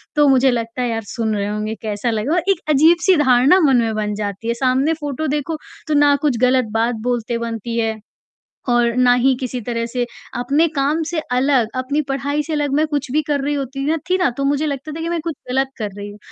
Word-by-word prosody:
तो 295 -1 +4
मुझे 265 0 +4
लगता 230 +1 -3
है 245 - 0
यार 225 -1 -2
सुन 220 -2 -1
रहे 200 - -1
होंगे, 210 +1 -3
कैसा 215 +2 -2
लगेगा? 230 +10 0
एक - - -1
अजीब-सी 335 +5 +5
धारणा 260 +8 +5
मन 275 -5 +4
में 225 -1 -1
बन 210 -1 -2
जाती 205 +1 -4
है, 235 - +1
सामने 265 +5 +1
फ़ोटो 290 +2 -3
देखो 300 +2 -2 0.3
तो 305 - 0
ना 290 -1 +5
कुछ 285 -6 +1
ग़लत 255 -1 +3
बात 230 +1 +1 0.2
बोलते 235 -1 -2
बनती 230 0 -4
है 220 -1 -1 0.7
और 240 -1 +3
ना 250 -1 +5
ही 260 +2 +3
किसी 255 -1 -3
तरह 230 0 -3
से 245 +1 -2 0.3
अपने 285 +7 +2
काम 285 +4 +1
से 340 - -1
अलग, 255 -2 +2
अपनी 270 +4 -1
पढ़ाई 280 +2 -1
से 320 - -5
अलग 290 -2 0
मैं 305 +2 +3
कुछ 290 -3 -2
भी 305 +3 +2
कर 290 -2 0
रही 285 +2 -1
होती 275 0 -4 0.2
थी 370 - +3
ना, 350 -6 +2
तो 275 - -1
मुझे 290 +2 +1
लगता 280 +2 -4
था 325 - -6
कि 335 - -3
मैं 345 - -1
कुछ 330 -3 -3
ग़लत 265 +1 +1
कर 215 -3 -3
रही 205 0 -6
हूँ, 205 - -11
260 Hz, 230 wpm, -19 LUFS, 230-290 Hz, 0.7 s, अजीब-सी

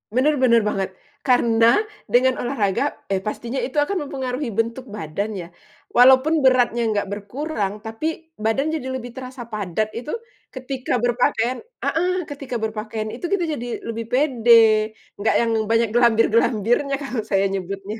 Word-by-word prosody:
Bener 295 +4 +3
bener 245 -3 +4
banget. 195 -2 -1 0.3
Karena 235 - +4 0.3
dengan 255 +1 +4
olahraga, 230 -3 0 0.2
eee, 195 -1 -1
pastinya 235 +4 -3
itu 270 +3 -1
akan 380 +7 +1
mempengaruhi 260 -2 -3
bentuk 230 +4 -2
badan 200 +4 -3
ya, 170 - -7 0.5
walaupun 265 +5 +6
beratnya 245 -2 +3
gak 205 -1 -1
berkurang 210 -1 -3
tapi 315 +9 -4
badan 225 +7 0
jadi 260 -5 -4
lebih 245 -2 -5
terasa 255 -2 -8
padat 215 -1 -2
itu 250 +6 -5 0.4
ketika 260 -1 -3
berpakaian 245 0 +1 0.3
heeh, 355 +3 +1 0.2
ketika 275 -4 -6
berpakaian 215 0 -4
itu 260 - -13
kita 355 -4 +1
jadi 245 -1 -6 0.2
lebih 230 0 -4
pede. 250 -3 +2 0.6
Nggak 205 +2 0
yang 230 -1 +1 0.2
banyak 230 0 +3
glambir-glambirnya 235 +2 +3
kalau 255 -6 -3
saya 195 -2 +1
nyebutnya. 195 +2 -5
240 Hz, 140 wpm, -22 LUFS, 215-260 Hz, 0.6 s, walaupun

